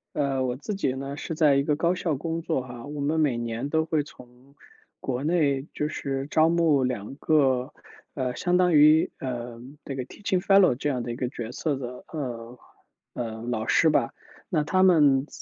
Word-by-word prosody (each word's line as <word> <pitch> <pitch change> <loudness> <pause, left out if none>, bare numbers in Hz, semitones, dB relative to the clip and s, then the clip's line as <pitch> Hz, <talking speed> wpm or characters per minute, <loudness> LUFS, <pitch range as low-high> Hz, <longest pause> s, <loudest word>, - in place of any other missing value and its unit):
呃， 135 -3 0
我 125 -1 -1
自 145 +10 -5
己 190 -10 -1
呢， 135 +2 -6
是 160 - -5
在 150 -3 +4
一 140 - +2
个 150 0 +1
高 170 +3 +1
校 170 -4 -1
工 165 +4 -3
作 160 -4 -1
哈。 120 -2 -9
我 145 +1 -7
们 150 +3 0
每 145 -6 +2
年 120 +3 -3
都 160 0 +1
会 160 -2 +1
从 125 -1 -15 0.4
国 130 0 -3
内 145 -4 +1
就 150 - -1
是 135 -2 -4
招 160 +1 +4
募 165 -5 +3
2 125 -3 -3
个， 135 -3 +2 0.4
呃， 125 -2 -2
相 180 +6 +1
当 180 -1 +3
于， 155 +1 +6
呃， 120 -2 -5 0.2
这 135 - -5
个 130 - -3
teaching 190 +5 -2
fellow 195 -3 +5
这 135 +4 -2
样 125 -4 -2
的 120 - -4
一 - - -4
个 125 0 -3
角 120 -3 -6
色 145 +3 -2
的， 125 -1 -7
呃， 125 -5 -6 0.5
呃， 115 -2 -5
老 115 -2 -3
师 160 - +4
吧。 - - +1 0.4
那 155 -5 +1
他 185 +5 +1
们 150 -7 +5
140 Hz, 255 characters per minute, -26 LUFS, 125-160 Hz, 0.5 s, 于